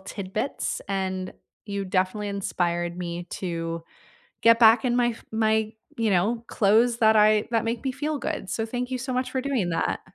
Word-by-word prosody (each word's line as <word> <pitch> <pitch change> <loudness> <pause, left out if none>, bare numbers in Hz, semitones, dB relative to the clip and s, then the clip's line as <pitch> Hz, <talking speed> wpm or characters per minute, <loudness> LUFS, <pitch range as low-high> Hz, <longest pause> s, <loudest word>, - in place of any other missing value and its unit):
tidbits, 195 +6 -4
and 190 -1 -2 0.3
you 200 -1 -3
definitely 190 +2 -1
inspired 175 -3 -2
me 175 -1 -4
to 165 -2 -4 0.6
get 230 0 +6
back 230 +2 +6
in 245 -1 +1
my 245 -1 +3
f 230 - -6
my, 220 -1 +1 0.2
you 225 -2 +1
know, 215 +6 +1
clothes 230 +3 +3
that 220 -1 +5
I 210 0 +4
that 230 -2 +1
make 230 +2 -3
me 265 - 0
feel 295 +3 -2
good, 195 - -4
so, 225 +3 -2
thank 245 +2 -4
you 255 - -2
so 255 +1 -4
much 255 0 -1
for 260 - -1
doing 255 -10 -1
that. 165 - -1
215 Hz, 185 wpm, -25 LUFS, 185-240 Hz, 0.6 s, get